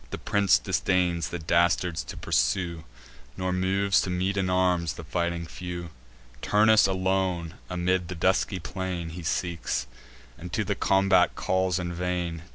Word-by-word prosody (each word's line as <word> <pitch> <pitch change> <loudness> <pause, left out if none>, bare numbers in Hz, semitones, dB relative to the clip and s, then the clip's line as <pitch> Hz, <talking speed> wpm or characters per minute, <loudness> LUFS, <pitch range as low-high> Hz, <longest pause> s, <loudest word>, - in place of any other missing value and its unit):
The - - -5
prince 100 -1 +3
disdains 90 -3 0
the 85 - -4
dastards 85 +1 +1
to - - -8
pursue, 80 +6 0 0.5
Nor 95 0 -1
moves 95 +2 +2
to - - -3
meet 90 +2 0
in 95 -2 0
arms 90 -3 +1
the 85 - -9
fighting 85 +1 -2
few; 85 0 -7 0.5
Turnus 110 0 +5
alone, 95 -3 0 0.2
amid 90 0 0
the 90 - -5
dusky 95 +3 +1
plain, 90 -1 -4
He 85 +2 -7
seeks, 85 0 -2 0.5
and 90 +1 -8
to 105 - +1
the 100 0 -1
combat 95 0 +3
calls 95 -1 0
in 90 -1 -3
vain. 90 -2 -2
90 Hz, 150 wpm, -27 LUFS, 85-95 Hz, 0.5 s, Turnus